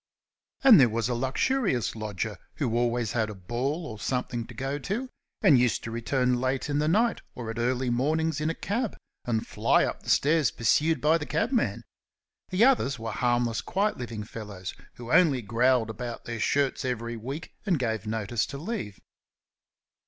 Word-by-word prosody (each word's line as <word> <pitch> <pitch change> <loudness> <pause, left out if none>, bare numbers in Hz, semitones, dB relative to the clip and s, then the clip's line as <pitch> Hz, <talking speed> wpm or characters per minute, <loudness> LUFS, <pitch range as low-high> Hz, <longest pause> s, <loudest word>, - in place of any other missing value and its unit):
And 255 - +9
there 125 -3 +6
was 115 +1 -1
a - - +1
luxurious 130 - 0
lodger 105 -1 -4 0.2
who 120 -6 -1
always 120 -2 +1
had 110 -3 0
a 105 - -7
ball 125 - -3
or 110 -7 -7
something 120 +1 -2
to 125 - -11
go 135 +4 -3
to, 220 - -3 0.3
and 135 -4 +7
used 125 -2 +1
to 115 - -5
return 125 +1 0
late 130 +2 -1
in 145 - +1
the 150 - +1
night 220 +7 +2
or 115 -2 -5
at 115 - -6
early 125 +1 0
morning 155 +6 +1
in 155 +1 0
a 165 - -2
cab, 225 +2 -2 0.3
and 115 -2 -1
fly - - +2
up - - -4
the - - -9
stairs 155 -1 +4
pursued 155 +7 +2
by 160 +2 +4
the 150 - -5
cabman. 235 +2 0 0.7
The 190 +5 +4
others 190 - +3
were 115 0 -4
harmless, 120 0 +1
quiet 205 -2 -1
living 115 -3 -5
fellows, 105 -4 -7 0.2
who 120 0 -8
only 155 -8 +4
growled 115 +1 +2
about 120 +2 -6
their 120 -1 -4
shirts 140 +5 +1
every 120 -2 -3
week 135 +8 -6
and 180 -4 +3
gave 110 -4 -2
notice 110 +1 -1
to 140 - -6
leave. 140 - -5
125 Hz, 180 wpm, -27 LUFS, 115-150 Hz, 0.7 s, And